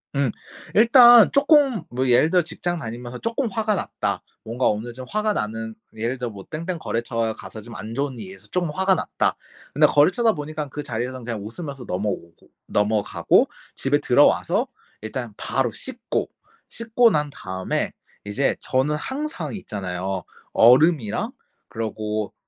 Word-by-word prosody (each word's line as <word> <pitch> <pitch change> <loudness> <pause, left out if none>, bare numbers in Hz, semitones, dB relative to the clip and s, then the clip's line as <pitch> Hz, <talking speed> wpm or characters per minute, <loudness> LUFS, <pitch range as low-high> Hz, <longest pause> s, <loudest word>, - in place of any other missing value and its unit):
음. 140 -4 +1 0.4
일단 240 0 +8
쪼끔 280 - +4
뭐 130 +2 -1
예를 125 +5 +5
들어 180 - +5
직장 175 +1 -3
다니면서 120 -2 -6
쪼끔 230 +3 -1
화가 215 +1 0
났다. - - -3 0.2
뭔가 120 +3 0
오늘 110 +3 -1
좀 130 +1 -8
화가 215 +6 0
나는 110 - -3 0.2
예를 115 +4 -2
들어 125 -2 -4
뭐 100 -2 -10
땡땡 170 +2 -4
거래처에 115 -3 -2
가서 110 - -10
좀 115 +2 -11
안 110 +3 -7
좋은 140 -1 -2
일이 95 -3 -8
있어 95 +2 -12
좀 175 +3 -1
화가 190 +4 +3
났다. - - 0 0.4
근데 - - +5
거래처다 220 +10 +4
보니깐 150 -1 -5
그 150 - -4
자리에선 125 +1 -4
그냥 115 -3 -4
웃으면서 135 +2 -7
넘어오고 90 -3 -4 0.2
넘어가고 105 0 +2 0.3
집에 145 +2 +1
들어와서 170 - +3 0.3
일단 110 +1 -5
바로 125 -3 0
씻고. 255 - -4 0.4
씻고 230 +1 +3
난 150 -3 0
다음에 95 -6 -3 0.3
이제 105 +7 0
저는 135 +4 0
항상 290 - -4
있잖아요. 95 - -4 0.3
얼음이랑 125 -1 +4 0.4
그러고 110 -1 -3
130 Hz, 320 characters per minute, -23 LUFS, 110-180 Hz, 0.4 s, 일단